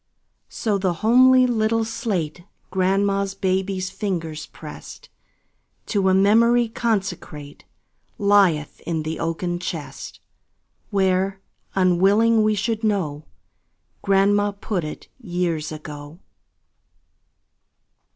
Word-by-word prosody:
So 210 -3 -1
the 185 -2 0
homely 255 +2 +6
little 225 -1 +1
slate 180 - -3 0.3
Grandma's 195 +1 +1
baby's 190 -1 -1
fingers 165 -7 -4
pressed, - - -11 0.8
To 195 -3 +1
a - - +3
memory 230 +4 +4
consecrate, 190 -10 -3 0.5
Lieth 195 -7 +2
in 160 -2 -1
the 160 +1 -4
oaken 175 +1 -2
chest, 150 -6 -6 0.7
Where, 190 0 +1 0.4
unwilling 195 +5 +4
we 215 0 +2
should 220 +2 -2
know, 165 -9 -1 0.8
Grandma 200 +1 +2
put 200 -2 -3
it, 150 - -7
years 175 -8 -2
ago. 150 0 -9
195 Hz, 95 wpm, -22 LUFS, 170-210 Hz, 0.8 s, homely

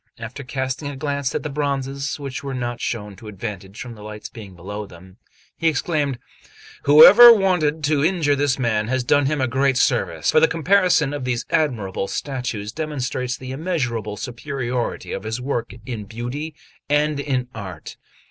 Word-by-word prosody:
After 115 +5 -7
casting 130 +2 -3
a 145 - -5
glance 140 -1 -2
at - - -2
the 150 - -3
bronzes, 140 0 -2
which 135 -2 -5
were 135 -1 -4
not 120 -1 -3
shown 105 -4 -4
to 110 - -12
advantage 100 -1 -7
from 120 -2 -7
the 105 - -13
light 105 0 -8
being 100 -6 -10
below 100 +4 -6
them, 95 +3 -15 0.4
he 165 - +2
exclaimed: 150 -3 0 0.7
"Whoever 200 +12 +10
wanted 180 -8 +2
to 145 -1 +2
injure 160 -4 +2
this 140 -1 +1
man 110 -4 0
has 130 +1 0
done 145 +3 +3
him 150 +1 0
a 130 - +1
great 135 +1 +1
service; - - +1
for - - +5
the 160 - +5
comparison 165 -3 +2
of 145 -3 -4
these 125 -1 -2
admirable 110 -11 0
statues 120 -7 -4
demonstrates 130 -4 -3
the 130 0 -8
immeasurable 125 - -2
superiority 125 -1 -4
of - - -3
his 110 +3 -4
work 125 -3 -3
in 110 -4 -5
beauty 125 +9 -5 0.3
and 150 0 +2
in 130 -3 -1
art. 95 -7 -8
130 Hz, 170 wpm, -22 LUFS, 115-145 Hz, 0.7 s, Whoever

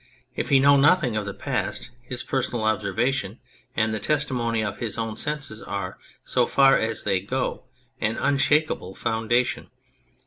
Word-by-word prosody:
If - - -2
he 140 - +6
know 140 +1 +6
nothing 140 -4 +4
of 105 -1 -1
the 100 - -4
past 120 - -3
his 125 0 -6
personal 125 -4 -1
observation 110 +2 0 0.4
and 110 0 +1
the 110 - -2
testimony 125 -7 0
of 105 - -3
his 115 -3 -4
own 115 -1 -3
senses 145 -6 -3
are, 95 -1 -5 0.3
so - - +2
far 135 0 +5
as 110 -1 0
they 95 - +1
go, 125 +7 -3 0.3
an 110 +2 -1
unshakable 145 -8 +1
founda 115 +2 +1
tion. - - -6
120 Hz, 160 wpm, -24 LUFS, 110-135 Hz, 0.4 s, he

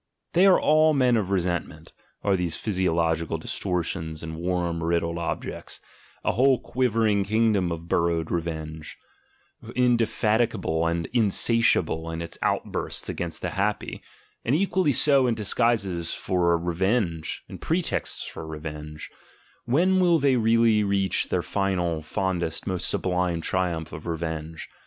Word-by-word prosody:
They 185 +3 +5
are 190 - +6
all 155 0 +4
men 125 -3 +3
of 105 -5 0
resentment, 90 -3 -2 0.3
are 100 -1 +2
these 90 -3 0
physiological 85 -5 0
distortions 85 -3 -3
and 80 -1 -5
worm 85 0 -2
riddled 85 0 0
objects, 85 -1 -5 0.5
a - - +3
whole 130 +5 +4
quivering 115 -5 +1
kingdom 105 -4 +1
of 85 0 -6
bur 85 0 +2
rowing 85 -1 -1
revenge, 80 -2 -4 0.8
indefatigable 115 -7 +1
and 85 0 -1
insatiable 110 -6 +2
in 80 0 -4
its 85 - -9
out - - 0
bursts - - -3
against - - -5
the - - -2
happy, - - -2 0.4
and 125 - +1
equally 185 -2 +2
so 135 0 +4
in 120 - +1
disguises 105 -6 0
for 85 -3 +1
revenge, 85 0 -1
in - - -9
pretexts 170 +1 -1
for 80 - -8
revenge: 75 0 -7 0.5
when 180 +10 +3
will 175 -2 +4
they 140 -3 +3
really 115 -2 +3
reach 100 -1 0
their - - 0
final, 90 -5 -1
fondest, 85 0 -2
most 95 -3 -2
sublime 90 -2 0
triumph 85 -2 -2
of 80 +3 -8
re 85 -1 -2
venge? 80 0 -5
90 Hz, 140 wpm, -25 LUFS, 85-115 Hz, 0.8 s, are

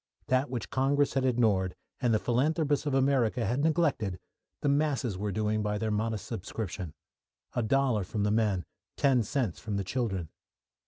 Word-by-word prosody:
That 130 +2 +2
which 120 -8 -4
Congress 140 +2 +2
had 135 -1 +1
ignored, 110 -7 +2 0.3
and 120 -2 +3
the 110 - +4
philanthropists 145 +6 +1
of 140 - +1
America 130 -3 +2
had 120 +6 0
neglected, 150 - +1 0.4
the - - 0
masses 140 -7 +1
were 100 +2 -2
doing 110 +2 0
by 105 0 -1
their 110 0 -1
modest 110 -1 -1
subscription 95 -6 -5 0.6
a 120 - 0
dollar 125 -2 +2
from 105 +2 -2
the 105 - +2
men, 105 -6 +1 0.3
ten 135 -3 +4
cents 115 - -1
from 105 -3 -3
the 100 - -1
children. 95 - -2
115 Hz, 165 wpm, -30 LUFS, 105-135 Hz, 0.6 s, the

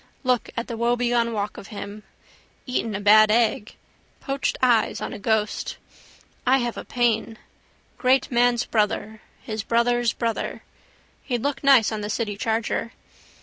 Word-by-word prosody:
Look 250 -2 +1
at 235 - -1
the 230 - -6
woebegone 240 0 +1
walk 210 -2 -3
of 195 - -9
him. 205 0 -8 0.6
Eaten 230 -4 -2
a - - -2
bad 215 +1 +6
egg. 220 -1 +1 0.4
Poached 275 -1 -2
eyes 240 -3 +2
on - - -5
ghost. 215 0 -1 0.7
I 260 +1 +4
have 240 -2 -2
a - - -6
pain. 230 -2 0 0.6
Great 260 +2 +2
man's 240 0 +2
brother: 215 0 -1 0.2
his 215 0 -4
brother's 235 +1 +1
brother. 230 -2 -3 0.6
He'd 245 -4 -3
look 285 0 -2
nice 270 -6 +5
on 215 -1 -3
the 205 - -4
city 215 -1 -2
charger. 225 +1 -2
230 Hz, 145 wpm, -24 LUFS, 215-245 Hz, 0.7 s, bad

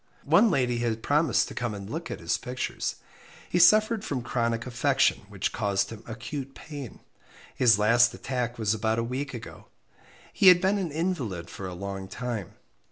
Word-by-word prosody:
One 230 - +5
lady 125 -8 +1
had 115 -2 -2
promised 150 0 +2
to - - -8
come 120 -4 -3
and 100 -1 -8
look 165 +9 -5
at - - -5
his - - 0
pictures. 125 0 -3 0.5
He 175 - 0
suffered 215 +4 +5
from 130 - -3
chronic 115 -1 -1
affection, 125 -1 +2
which - - -2
caused 100 +1 -1
him 110 -2 -8
acute 130 +4 -6
pain. 145 -6 -9 0.5
His 115 -5 +5
last 115 +3 +4
attack 125 -2 -3
was 110 -2 +1
about 110 +1 0
a 115 - 0
week 130 +3 -4
ago. 115 - -10 0.7
He 195 - +4
had 180 -1 +9
been 190 +3 +1
an 175 -5 -3
invalid 130 - -3
for 95 - -6
a 90 - -6
long 95 +1 -5
time. 115 -2 -5
120 Hz, 175 wpm, -27 LUFS, 110-145 Hz, 0.7 s, had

